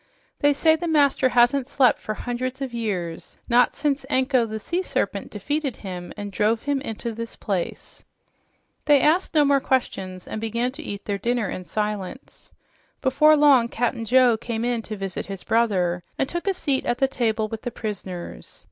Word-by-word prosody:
"They 290 Hz, -, +4 dB
say 315 Hz, +3 st, +4 dB
the 340 Hz, +2 st, -4 dB
master 285 Hz, -4 st, +3 dB
hasn't 245 Hz, +2 st, +3 dB
slept 265 Hz, -4 st, +3 dB
for 215 Hz, -, -4 dB
hundreds 250 Hz, +3 st, -4 dB
of 265 Hz, -3 st, -4 dB
years, 185 Hz, -8 st, -4 dB
not 245 Hz, 0 st, +4 dB
since 285 Hz, -2 st, 0 dB
Anko, 260 Hz, -3 st, +2 dB
the 220 Hz, 0 st, -5 dB
sea 345 Hz, -, -2 dB
serpent, -, -, -2 dB
defeated 290 Hz, -4 st, -3 dB
him 180 Hz, -2 st, -6 dB
and 205 Hz, -1 st, -5 dB
drove 215 Hz, +3 st, +1 dB
him 285 Hz, -1 st, 0 dB
into 230 Hz, -2 st, -4 dB
this 230 Hz, +1 st, -6 dB
place." 190 Hz, -5 st, -4 dB, 0.8 s
They 290 Hz, -1 st, +6 dB
asked 325 Hz, +5 st, +2 dB
no 300 Hz, -1 st, +5 dB
more 280 Hz, 0 st, +4 dB
questions 190 Hz, -9 st, -2 dB
and 215 Hz, -, -5 dB
began 235 Hz, +3 st, -1 dB
to 295 Hz, +5 st, -8 dB
eat 200 Hz, -9 st, -6 dB
their 200 Hz, -1 st, -2 dB
dinner 235 Hz, -2 st, 0 dB
in 185 Hz, -, -6 dB
silence. 210 Hz, +4 st, -5 dB, 0.5 s
Before 300 Hz, +3 st, +5 dB
long, 280 Hz, -5 st, +6 dB
Cap'n 235 Hz, -1 st, -2 dB
Joe 250 Hz, -1 st, +5 dB
came 230 Hz, 0 st, -3 dB
in 240 Hz, -1 st, 0 dB
to 215 Hz, -, -4 dB
visit 195 Hz, -2 st, -4 dB
his 195 Hz, -2 st, -6 dB
brother 185 Hz, -7 st, +1 dB, 0.2 s
and 270 Hz, -, 0 dB
took 345 Hz, +5 st, -5 dB
a 390 Hz, -, +3 dB
seat 275 Hz, -6 st, 0 dB
at 240 Hz, -, +1 dB
the 270 Hz, -, +3 dB
table 225 Hz, -4 st, 0 dB
with 220 Hz, 0 st, -6 dB
the 245 Hz, -, -3 dB
prisoners. 190 Hz, -, -6 dB
240 Hz, 185 wpm, -24 LUFS, 210-275 Hz, 0.8 s, They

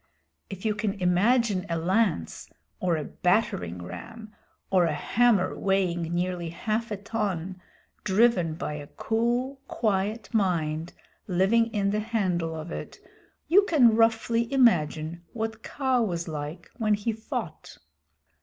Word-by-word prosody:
If 195 Hz, +1 st, -8 dB
you 215 Hz, -, +2 dB
can 210 Hz, -1 st, -1 dB
imagine 200 Hz, +2 st, +2 dB
a 165 Hz, -, 0 dB
lance, 180 Hz, -, 0 dB, 0.3 s
or 175 Hz, -3 st, +1 dB
a 155 Hz, -, -3 dB
battering 90 Hz, -, 0 dB
ram, 215 Hz, -, -9 dB, 0.4 s
or 185 Hz, -2 st, +4 dB
a 155 Hz, -3 st, 0 dB
hammer 220 Hz, 0 st, +2 dB
weighing 190 Hz, -3 st, +1 dB
nearly 175 Hz, -1 st, -1 dB
half 220 Hz, +6 st, -2 dB
a 210 Hz, -, -3 dB
ton 190 Hz, -4 st, -3 dB, 0.4 s
driven 190 Hz, -6 st, +3 dB
by 150 Hz, -, -4 dB
a 145 Hz, -1 st, -7 dB
cool, 240 Hz, -, -1 dB
quiet 210 Hz, +1 st, -1 dB
mind 165 Hz, -6 st, 0 dB, 0.3 s
living 200 Hz, +5 st, +3 dB
in 205 Hz, -3 st, 0 dB
the 210 Hz, -, 0 dB
handle 185 Hz, -7 st, -1 dB
of 160 Hz, +2 st, -7 dB
it, -, -, -7 dB, 0.5 s
you 375 Hz, +5 st, +6 dB
can 250 Hz, -, +5 dB
roughly 230 Hz, +1 st, +2 dB
imagine 170 Hz, -, +2 dB
what 225 Hz, -1 st, -4 dB
Kaa 260 Hz, -1 st, 0 dB
was 175 Hz, -6 st, -2 dB
like 155 Hz, +2 st, -6 dB
when 215 Hz, -3 st, +2 dB
he 210 Hz, +3 st, -2 dB
fought. 220 Hz, +1 st, -6 dB
200 Hz, 135 wpm, -27 LUFS, 170-225 Hz, 0.5 s, you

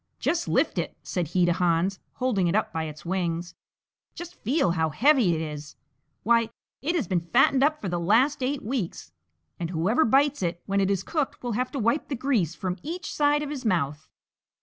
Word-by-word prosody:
"Just 340 Hz, 0 st, -1 dB
lift -, -, +1 dB
it," -, -, -4 dB
said 175 Hz, -3 st, -2 dB
he 175 Hz, +2 st, +2 dB
to 175 Hz, -, +3 dB
Hans, 180 Hz, +2 st, +1 dB
holding 240 Hz, -9 st, 0 dB
it 170 Hz, -, +1 dB
up 215 Hz, -, 0 dB
by 160 Hz, 0 st, -2 dB
its 155 Hz, +1 st, -9 dB
wings, 175 Hz, -1 st, -2 dB, 0.6 s
"just 345 Hz, 0 st, -8 dB
feel 260 Hz, -, +2 dB
how 160 Hz, -2 st, +1 dB
heavy 230 Hz, -, +4 dB
it 160 Hz, -, -2 dB
is; 150 Hz, -1 st, -6 dB, 0.5 s
why, 230 Hz, 0 st, +3 dB, 0.3 s
it 330 Hz, +6 st, -1 dB
has 300 Hz, -10 st, 0 dB
been 185 Hz, -3 st, +1 dB
fattened 255 Hz, +9 st, +3 dB
up 305 Hz, +1 st, +2 dB
for 200 Hz, -, -5 dB
the 175 Hz, -1 st, -1 dB
last 230 Hz, -, +3 dB
eight 270 Hz, +2 st, -1 dB
weeks, 210 Hz, -, -4 dB, 0.5 s
and 170 Hz, -, -3 dB
whoever 185 Hz, -, +2 dB
bites 275 Hz, +3 st, +3 dB
it 175 Hz, -1 st, -2 dB
when 200 Hz, 0 st, +1 dB
it 195 Hz, -, +1 dB
is 195 Hz, -2 st, 0 dB
cooked 300 Hz, -1 st, -2 dB
will 245 Hz, -, -2 dB
have 250 Hz, +3 st, -1 dB
to -, -, -3 dB
wipe 235 Hz, +5 st, +1 dB
the 280 Hz, -, -3 dB
grease 230 Hz, -, 0 dB
from 185 Hz, -2 st, -3 dB
each 350 Hz, +5 st, -5 dB
side 295 Hz, 0 st, +2 dB
of 295 Hz, -, -5 dB
his 280 Hz, -4 st, -5 dB
mouth!" 155 Hz, -, -1 dB
205 Hz, 205 wpm, -26 LUFS, 170-275 Hz, 0.6 s, heavy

